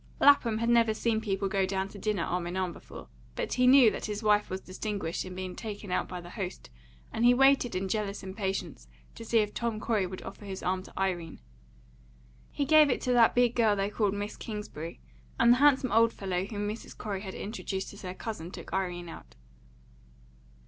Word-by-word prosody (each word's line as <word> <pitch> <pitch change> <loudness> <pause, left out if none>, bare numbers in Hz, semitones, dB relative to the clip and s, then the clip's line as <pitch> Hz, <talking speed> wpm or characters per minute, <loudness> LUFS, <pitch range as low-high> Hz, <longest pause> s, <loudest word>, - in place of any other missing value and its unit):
Lapham 240 -6 +5
had 230 +1 0
never 230 -2 +4
seen 220 -1 0
people 195 -2 -1
go 195 0 +1
down 190 0 -1
to 200 - -11
dinner 205 -3 -1
arm 175 0 -2
in 175 +2 -4
arm 185 -2 -1
before, - - -11 0.3
but - - -2
he 250 0 +3
knew 255 -4 +8
that - - -5
his 210 +1 -4
wife 210 -1 +3
was 185 - -3
distinguished 190 -2 -4
in 185 0 -8
being 185 -1 -5
taken 205 -3 -7
out 185 - 0
by 180 - -6
the 175 0 -11
host, 190 - -6 0.4
and 225 - -1
he 245 +1 +6
waited 270 -3 +4
in 190 +1 -1
jealous 200 0 -2
impatience 190 0 -4 0.3
to 230 - -9
see 230 0 +1
if 210 -1 -3
Tom 235 -2 -2
Corey 215 -4 0
would 185 +1 -8
offer 205 - -9
his 195 -1 -6
arm 185 +1 0
to 190 - -11
Irene. 175 -4 -2 1.1
He 285 - -2
gave 305 0 +6
it 250 - +1
to 250 - +1
that 235 -2 +5
big 245 -1 +4
girl 225 -4 +3
they 200 +1 -1
called 205 -2 0
Miss 205 +1 -4
Kingsbury, 205 -7 -7 0.4
and 235 - +7
the - - +2
handsome 270 -2 +4
old 230 0 +4
fellow 185 -2 -2
whom 205 0 -4
Mrs. 215 +2 -7
Corey 200 -3 -4
had 190 -2 -7
introduced 195 -2 -5
as 200 - -11
her 185 -1 -6
cousin 200 -7 -6
took - - -10
Irene 180 -2 -2
out. 60 - -11
205 Hz, 210 wpm, -29 LUFS, 190-230 Hz, 1.1 s, knew